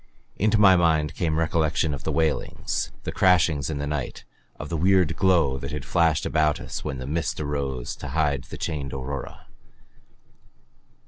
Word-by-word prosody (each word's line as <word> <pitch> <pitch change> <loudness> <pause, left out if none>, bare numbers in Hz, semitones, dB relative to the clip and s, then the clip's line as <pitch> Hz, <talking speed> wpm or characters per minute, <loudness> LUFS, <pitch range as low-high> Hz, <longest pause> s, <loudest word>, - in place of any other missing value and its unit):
Into 110 +2 +2
my 100 -3 +7
mind 80 -4 +2
came 80 -3 -1
recollection 80 -1 +1
of 65 - -6
the - - 0
wailings, 80 -2 -1
the - - -3
crashings 80 -6 +3
in 75 - -3
the 70 - -3
night, 75 -3 -4 0.3
of - - -6
the 85 - -2
weird 90 0 +3
glow 85 -8 +2
that 70 +2 -6
had 75 -2 -5
flashed 80 +1 +2
about 75 -2 +1
us - - -6
when 65 - -4
the 65 - -6
mist 80 +3 -2
arose 70 -4 -3
to - - -7
hide 75 -5 0
the - - -9
chained 70 -5 -4
aurora. 65 +1 -6
75 Hz, 170 wpm, -25 LUFS, 70-85 Hz, 0.3 s, my